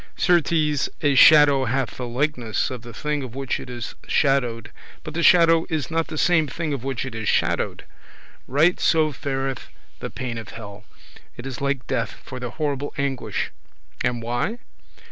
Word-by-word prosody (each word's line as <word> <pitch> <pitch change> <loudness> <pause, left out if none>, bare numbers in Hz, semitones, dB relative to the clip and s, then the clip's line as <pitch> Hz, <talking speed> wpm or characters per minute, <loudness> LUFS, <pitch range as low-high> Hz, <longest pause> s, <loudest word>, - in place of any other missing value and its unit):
Certes 175 -4 +3 0.5
a 145 -1 +4
shadow 145 -1 +7
hath 130 +1 -1
the 125 - -4
likeness 125 -3 -1
of 125 -2 -6
the 120 0 -10
thing 150 +5 -2
of 130 -2 -7
which 135 -1 -2
it - - -9
is 120 -5 -6
shadowed, 125 -6 +1 0.3
but 155 - -7
the 170 - -1
shadow 165 -1 +5
is 160 -1 -2
not 165 0 0
the 155 - -6
same 170 -1 +3
thing 155 +2 -3
of 135 -4 -4
which 135 -2 -3
it 130 - -6
is 110 -2 -2
shadowed: - - 0 0.6
right 155 +7 +3
so 155 -2 +3
fareth 135 -2 -3 0.3
the - - -5
pain 120 -3 -5
of 105 -3 -9
hell; 105 -1 -10 0.5
it 120 - -8
is 135 -1 -6
like 140 -2 -1
death, 115 -2 -2
for 130 - -8
the 125 -1 -4
horrible 145 +1 -3
anguish; 140 -2 -2 0.5
and 120 -1 -1
why? 120 - -1
135 Hz, 175 wpm, -23 LUFS, 120-150 Hz, 0.6 s, shadow